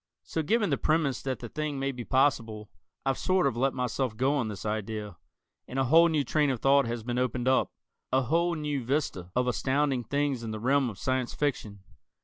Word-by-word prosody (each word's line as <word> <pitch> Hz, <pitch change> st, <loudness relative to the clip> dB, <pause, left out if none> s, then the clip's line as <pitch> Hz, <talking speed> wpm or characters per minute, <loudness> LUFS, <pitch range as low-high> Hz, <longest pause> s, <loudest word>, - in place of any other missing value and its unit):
So 160 Hz, -, -2 dB
given 210 Hz, +7 st, +1 dB
the -, -, +1 dB
premise 155 Hz, -4 st, +1 dB
that 130 Hz, -1 st, -3 dB
the 120 Hz, -, -5 dB
thing 150 Hz, 0 st, -3 dB
may 135 Hz, 0 st, -1 dB
be 125 Hz, -2 st, -7 dB
possible, 115 Hz, -6 st, 0 dB, 0.3 s
I've 135 Hz, 0 st, 0 dB
sort 185 Hz, -2 st, +2 dB
of 135 Hz, -4 st, +1 dB
let 135 Hz, +3 st, +1 dB
myself 125 Hz, -2 st, -2 dB
go 135 Hz, +4 st, +2 dB
on 135 Hz, -6 st, 0 dB
this 105 Hz, -2 st, -7 dB
idea, 105 Hz, -3 st, -4 dB, 0.5 s
and 130 Hz, -, -6 dB
a 135 Hz, -, +3 dB
whole 165 Hz, +6 st, +6 dB
new 155 Hz, -3 st, +1 dB
train 150 Hz, +2 st, +1 dB
of 130 Hz, -3 st, -1 dB
thought 135 Hz, 0 st, +4 dB
has 115 Hz, -1 st, -4 dB
been 120 Hz, +1 st, -2 dB
opened 125 Hz, 0 st, -1 dB
up, 130 Hz, 0 st, +3 dB, 0.4 s
a 130 Hz, +1 st, +3 dB
whole 170 Hz, +7 st, +1 dB
new 150 Hz, -4 st, -2 dB
vista 115 Hz, -, -2 dB
of 125 Hz, 0 st, +1 dB
astounding 135 Hz, +1 st, +1 dB
things 140 Hz, 0 st, -1 dB
in 115 Hz, -, -5 dB
the 110 Hz, 0 st, -4 dB
realm 135 Hz, +2 st, +2 dB
of 105 Hz, -, -9 dB
Science 130 Hz, +3 st, -1 dB
Fiction. 110 Hz, -9 st, -2 dB
130 Hz, 210 wpm, -28 LUFS, 115-145 Hz, 0.5 s, whole